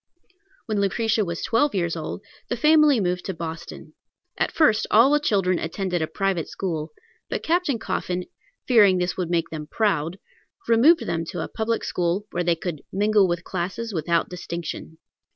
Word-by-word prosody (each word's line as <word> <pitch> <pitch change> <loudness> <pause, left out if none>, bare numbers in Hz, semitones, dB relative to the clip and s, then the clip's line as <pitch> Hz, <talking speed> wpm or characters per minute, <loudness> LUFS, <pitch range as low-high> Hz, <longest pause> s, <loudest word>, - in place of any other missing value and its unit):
When 215 -3 -1
Lucretia 215 +2 +1
was 170 -3 -4
twelve 280 +2 +2
years 170 -3 0
old, 160 +4 -5 0.3
the 245 - -1
family 300 -1 +5
moved 180 -2 -1
to 190 - -4
Boston. 165 0 -7 0.4
At - - 0
first 225 -9 +3
all 235 +6 +6
the 295 - +4
children 195 -10 +1
attended 180 +1 -2
a 160 - 0
private 195 -4 -1
school; 160 -5 -3 0.4
but - - -3
Captain 335 -6 +1
Coffin, 180 -4 -3 0.4
fearing 205 -7 +6
this 180 0 -1
would 180 -3 -3
make 170 -1 0
them 155 -2 -6
proud, 175 -4 0 0.5
removed 255 +9 +5
them 165 -1 -1
to - - -5
a - - -4
public 225 0 -2
school, 180 +3 -1
where 175 - -1
they 170 -1 +2
could 165 -3 -5
"mingle 205 0 +3
with 175 -1 -1
all - - -17
classes 195 +5 -3
without 170 0 0
distinction." 170 -2 -6
185 Hz, 170 wpm, -24 LUFS, 170-225 Hz, 0.5 s, all